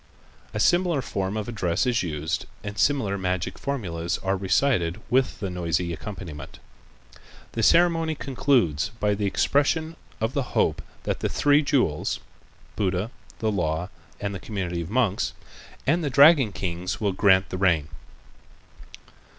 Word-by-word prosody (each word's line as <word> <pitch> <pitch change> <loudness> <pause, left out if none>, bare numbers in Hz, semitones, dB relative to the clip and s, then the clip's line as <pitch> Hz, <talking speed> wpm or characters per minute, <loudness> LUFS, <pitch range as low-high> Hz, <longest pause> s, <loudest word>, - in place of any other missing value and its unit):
A 105 - -4
similar 175 +1 +3
form 95 +2 -2
of 105 - -3
address 105 -2 0
is 120 -2 +2
used 80 -3 -3 0.2
and 100 -1 -5
similar 105 -6 +1
magical 90 -2 -2
formulas 85 -11 -2
are 95 +1 +1
recited 95 -2 +1
with 130 +1 +2
the 100 -3 -3
noisy 85 -1 -1
accompaniment. 85 -7 -8 0.9
The 115 - -2
ceremony 165 +3 +4
concludes 125 - +1
by 105 0 +2
the 100 0 -1
expression 155 +9 +1 0.2
of 110 +3 -1
the 140 - +1 0.2
hope - - +2 0.2
that - - -2
the - - -1
three 145 +1 +4
jewels 125 - 0 0.6
(Buddha, 95 +2 -1 0.3
the 110 -1 0
Law 85 -2 -1 0.3
and 100 0 -3
the 95 - -5
Community 90 -5 -3
of 80 - -6
Monks) 110 -4 +1 0.5
and 165 +4 +2
the 145 - 0
dragon 140 -4 +6
kings 90 -1 -3
will 105 -2 +1
grant 95 -1 +4
the 90 - -4
rain. 85 -6 +2
100 Hz, 140 wpm, -25 LUFS, 90-135 Hz, 0.9 s, dragon